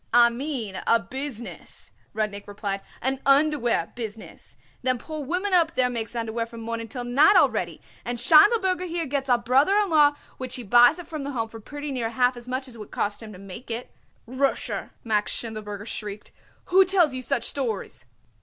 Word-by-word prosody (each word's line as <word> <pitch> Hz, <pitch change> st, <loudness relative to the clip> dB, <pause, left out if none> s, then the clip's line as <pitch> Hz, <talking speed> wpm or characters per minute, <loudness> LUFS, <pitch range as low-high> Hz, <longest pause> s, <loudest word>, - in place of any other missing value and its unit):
"I 235 Hz, 0 st, +6 dB
mean 240 Hz, -6 st, -4 dB
a 230 Hz, -, +5 dB
business," 250 Hz, +2 st, -6 dB, 0.2 s
Rudnik 210 Hz, -2 st, -3 dB
replied, 200 Hz, -1 st, -4 dB, 0.2 s
"an 265 Hz, +1 st, 0 dB
underwear 275 Hz, -, +2 dB
business. 225 Hz, -3 st, -8 dB, 0.2 s
Them 255 Hz, 0 st, +1 dB
poor 310 Hz, +5 st, -6 dB
women 365 Hz, +7 st, -1 dB
up 335 Hz, -2 st, +3 dB
there 250 Hz, -1 st, +2 dB
makes 230 Hz, 0 st, -4 dB
underwear 230 Hz, 0 st, -2 dB
from 230 Hz, 0 st, -10 dB
morning 230 Hz, 0 st, -4 dB
till 245 Hz, +2 st, -5 dB
night 275 Hz, +10 st, +5 dB
already, -, -, +2 dB, 0.2 s
and 240 Hz, 0 st, -3 dB
Schindelberger 370 Hz, -, +5 dB
here 340 Hz, -1 st, -2 dB
got 270 Hz, -1 st, -2 dB
a 245 Hz, -, +5 dB
brother 260 Hz, +10 st, +3 dB
in 410 Hz, -3 st, +2 dB
law 295 Hz, -2 st, +5 dB, 0.2 s
which 255 Hz, -1 st, -4 dB
he 250 Hz, -, -6 dB
buys 240 Hz, -, +6 dB
it 355 Hz, -, -8 dB
from 310 Hz, -2 st, -6 dB
the 285 Hz, 0 st, -4 dB
Home 225 Hz, -3 st, -2 dB
for 225 Hz, -, -10 dB
pretty 290 Hz, +6 st, -7 dB
near 240 Hz, -4 st, -2 dB
half 245 Hz, +2 st, +2 dB
as 240 Hz, 0 st, -11 dB
much 260 Hz, +1 st, -3 dB
as 250 Hz, -, -11 dB
it -, -, -13 dB
would 210 Hz, -, -9 dB
cost 205 Hz, +2 st, -2 dB
him 220 Hz, -1 st, -9 dB
to 190 Hz, -, -11 dB
make 195 Hz, +6 st, -10 dB
it." 235 Hz, +2 st, -5 dB, 0.3 s
"Rosher!" 260 Hz, +3 st, -1 dB
Max 210 Hz, -2 st, 0 dB
Schindelberger 210 Hz, -3 st, -5 dB
shrieked. 210 Hz, -2 st, -6 dB, 0.4 s
"Who 385 Hz, +1 st, +8 dB
tells 365 Hz, -6 st, +3 dB
you 255 Hz, -, -3 dB
such 240 Hz, -1 st, -1 dB
stories?" 235 Hz, -6 st, -3 dB
245 Hz, 190 wpm, -25 LUFS, 225-290 Hz, 0.4 s, Who